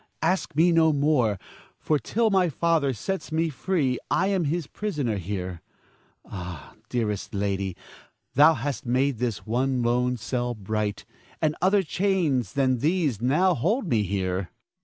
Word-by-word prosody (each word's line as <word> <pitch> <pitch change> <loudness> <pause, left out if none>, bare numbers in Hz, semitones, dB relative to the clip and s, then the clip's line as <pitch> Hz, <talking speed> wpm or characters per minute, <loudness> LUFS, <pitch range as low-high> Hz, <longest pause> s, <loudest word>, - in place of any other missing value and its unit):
Ask 175 -2 0
me 170 +3 +5
no 165 -1 +5
more; 140 -8 +2 0.4
for 155 -2 0
till 225 +6 +1
thy 185 -3 +3
father 160 -2 +1
sets 185 - -4
me 160 +1 +1
free, 145 -5 0
I 190 +2 +2
am 190 -4 +1
his 160 +2 -1
prisoner 145 - -2
here. 90 -2 -4 0.6
Ah, 90 -5 -8 0.2
dearest 105 -5 -2
lady, 100 -2 -2 0.6
thou 150 +4 +6
hast 145 0 -3
made 130 0 +1
this 120 -4 -2
lone 125 +1 +1
cell 120 +2 -2
bright, 105 0 -3 0.3
and 155 -1 +1
other 195 +2 +4
chains 165 - 0
than 130 -3 +2
these 150 - 0
now 155 +10 +3
hold 205 - 0
me 115 -8 +2
here. 95 -2 -2
135 Hz, 140 wpm, -25 LUFS, 110-165 Hz, 0.6 s, thou